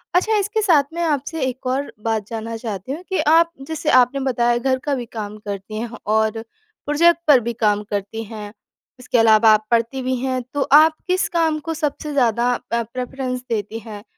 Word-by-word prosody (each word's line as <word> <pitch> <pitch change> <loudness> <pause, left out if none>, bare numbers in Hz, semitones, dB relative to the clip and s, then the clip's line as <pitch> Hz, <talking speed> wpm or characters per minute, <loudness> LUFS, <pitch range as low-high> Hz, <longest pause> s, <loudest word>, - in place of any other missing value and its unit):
अच्छा, 435 +5 +3
इसके 420 +2 0
साथ 335 -9 +4
मैं 340 0 -2
आपसे 305 +1 -2
एक 260 +1 -5
और 270 +3 -1
बात 220 -3 -1
जानना 225 0 -5
चाहती 220 -1 -6
हूँ 320 +6 -5
कि 380 - 0
आप 335 +1 +5 0.2
जैसे 320 -1 -3
आपने 250 +3 0
बताया, 240 -3 +1
घर 260 +2 0
का 290 -2 +1
भी 245 -2 -4
काम 215 -2 -7
करती 205 0 -6
हैं 235 +1 -4 0.2
और 220 0 +1 0.4
प्रोजेक्ट 335 +3 +4
पर 285 -4 +7
भी 235 0 -3
काम 210 -2 +1
करती 205 +2 -4
हैं, 210 -1 -9 0.5
इसके 250 -1 -1
अलावा 220 0 +6
आप 215 0 +1
पढ़ती 235 +3 +1
भी 260 0 -1
हैं। 260 -1 -1
तो 285 - -1
आप 310 +2 +7
किस 370 0 +1
काम 325 -2 +1
को 325 - -1
सबसे 300 -1 -3
ज़्यादा 240 -2 +2 0.2
अ, 235 0 +1
प्रेफरेंस 255 +2 -5
देती 220 0 -3
हैं, 215 -3 -10
250 Hz, 195 wpm, -20 LUFS, 220-295 Hz, 0.5 s, पर